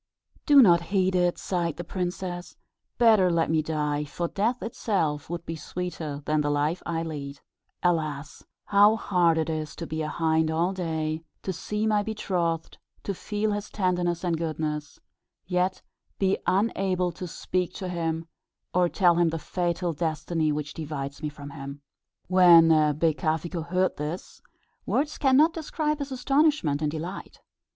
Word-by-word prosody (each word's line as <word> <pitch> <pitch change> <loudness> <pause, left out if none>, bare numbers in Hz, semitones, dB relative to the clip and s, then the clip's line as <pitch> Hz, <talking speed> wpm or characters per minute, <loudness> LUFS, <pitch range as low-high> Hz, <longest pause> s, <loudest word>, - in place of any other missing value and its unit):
"Do 285 -3 +8
not 170 -5 +6
heed 190 -1 +2
it," 175 -1 +2
sighed 170 -4 -2
the 175 - -4
princess; 180 0 -4 0.4
"better 220 -6 +5
let 165 -2 +1
me 160 -1 +3
die, 150 -1 -1
for 170 +4 -3
death 225 +8 -1
itself 175 -11 -1
would 175 0 -5
be 165 - -4
sweeter 160 -4 -5
than 155 0 +1
the 145 - 0
life 145 +4 0
I 165 -1 -1
lead. 140 -3 -6 0.4
Alas! 155 -4 -1 0.2
how 205 +2 +5
hard 175 -6 +2
it 160 - 0
is 155 -2 -3
to 170 - -6
be 160 0 -3
a 155 - -2
hind 160 0 +1
all 170 +4 +1
day; 160 -3 -2 0.2
to 190 - -2
see 210 +5 -3
my 210 -1 +3
betrothed, 180 -6 -2 0.2
to 200 - -2
feel 210 +3 -2
his 205 0 -3
tenderness 180 -3 0
and 170 -3 0
goodness, 155 -2 -3 0.5
yet 180 +1 0 0.3
be 195 -1 +1
unable 190 -3 +1
to 180 +2 -7
speak 180 +1 -2
to 190 - -5
him, 165 -2 -2 0.5
or 180 -1 +3
to - - -22
tell 175 -3 +6
him 175 -1 +4
the 165 - -2
fatal 175 +1 -2
destiny 160 0 -1
which 150 0 -3
divides 145 -3 -5
me 150 - -2
from 145 -1 -10
him." 140 -1 -8 0.4
When 175 -3 +7 0.3
Becafico 160 +1 0
heard 185 +1 +1
this, 150 +5 -6 0.4
words 295 +1 -1
cannot 285 +4 +5
describe 305 -1 -2
his 280 -1 -4
astonishment 270 - +2
and 150 - +1
delight. 165 +5 -6
170 Hz, 160 wpm, -26 LUFS, 155-190 Hz, 0.5 s, Do